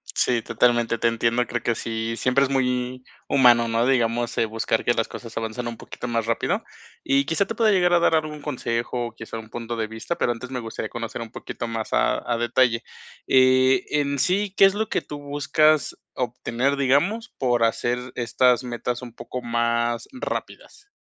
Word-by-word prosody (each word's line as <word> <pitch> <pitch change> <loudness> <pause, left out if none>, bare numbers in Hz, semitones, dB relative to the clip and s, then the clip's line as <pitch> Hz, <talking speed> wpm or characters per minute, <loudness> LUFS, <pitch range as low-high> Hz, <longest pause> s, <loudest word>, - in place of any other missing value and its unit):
Sí, 120 -2 +2
totalmente 115 +1 +2
te 115 - +1
entiendo, 115 +1 +1
creo 120 - -3
que 120 - +1
sí, 115 0 -3
siempre 130 +2 +2
es 135 - 0
muy 125 -1 -1 0.3
humano, 120 -3 +5
¿no?, 115 +1 +1
digamos, 120 -2 +1
eh, 115 - +3
buscar 110 0 -1
que 120 - +3
las 115 -1 0
cosas 115 -2 -9
avancen 115 +2 -3
un 115 - -8
poquito - - -9
más 115 -1 0
rápido, 115 0 0 0.4
y 140 +1 +2
quizá 165 +7 +1
te 225 - -5
pueda 220 -1 +3
llegar 180 -3 +3
a 175 - +6
dar 165 -1 +3
algún 155 -1 -2
consejo 120 -3 -2
o - - -9
quizá 115 0 -7
un 110 -1 -11
punto 120 0 -5
de 110 -1 -1
vista, 115 +10 -5
pero 120 - +1
antes 125 +2 -9
me 125 - -3
gustaría 115 -1 -5
conocer 115 0 -5
un 115 -1 -7
poquito - - -6
más 115 -1 -4
a 65 0 +2
a 115 - +2
detalle, 120 0 +2 0.4
eh, 130 0 +4
en 140 -1 0
sí, 190 +5 +1
¿qué 195 - +7
es 195 - +4
lo 220 +1 -2
que - - 0
tú 150 - -8
buscas 145 +1 +2 0.2
obtener, 125 +2 -1
digamos, 145 - +1
por 120 -3 +1
hacer 120 +2 +1 0.2
estas 125 +1 +2
metas 120 0 -3
un 120 -2 -9
poco 125 +1 -6
más 115 0 0
rápidas? 275 +9 -6
120 Hz, 195 wpm, -24 LUFS, 115-140 Hz, 0.4 s, qué